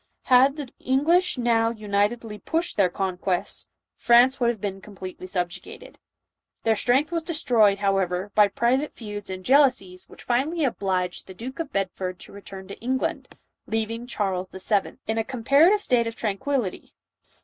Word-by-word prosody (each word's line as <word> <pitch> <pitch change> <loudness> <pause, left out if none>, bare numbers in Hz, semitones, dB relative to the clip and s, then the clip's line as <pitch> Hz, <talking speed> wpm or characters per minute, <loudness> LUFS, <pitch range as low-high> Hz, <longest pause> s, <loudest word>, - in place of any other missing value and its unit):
Ilad 265 +3 +6
the 290 -4 -6
English 320 +7 +2
now 230 -2 +2
unitedly 210 0 -1
pushed 330 - -2
their 195 -3 +3
conquests, 185 -1 -2 0.2
France 240 +2 +4
would 240 -2 +3
have 235 -3 -2
been 195 -1 -4
completely 185 -2 -9
subjugated. 180 -2 -5 0.6
Their 225 -1 +3
strength 260 +8 +2
was 335 -1 -1
destroyed, 245 - +3
however, 195 -1 0
by 210 -1 +6
private 250 +8 0
feuds 210 -3 -7
and 185 -1 -6
jealousies 250 -10 +3
which - - -13
finally 290 +6 0
obliged 185 -7 -2
the 190 - -10
Duke 255 - -7
of 325 -4 -4
Bedford 185 -1 -3
to - - -10
return 195 -1 -10
to 200 - -9
England, 260 +2 -2 0.3
leaving 225 +2 -3
Charles 190 -5 -2
VII. 195 +1 -1
in 220 +1 -1
a - - +1
com 245 -1 -7
parative 330 - +5
state 240 - +2
of 230 - -5
tranquillity. 215 0 -3
225 Hz, 155 wpm, -25 LUFS, 195-260 Hz, 0.6 s, Ilad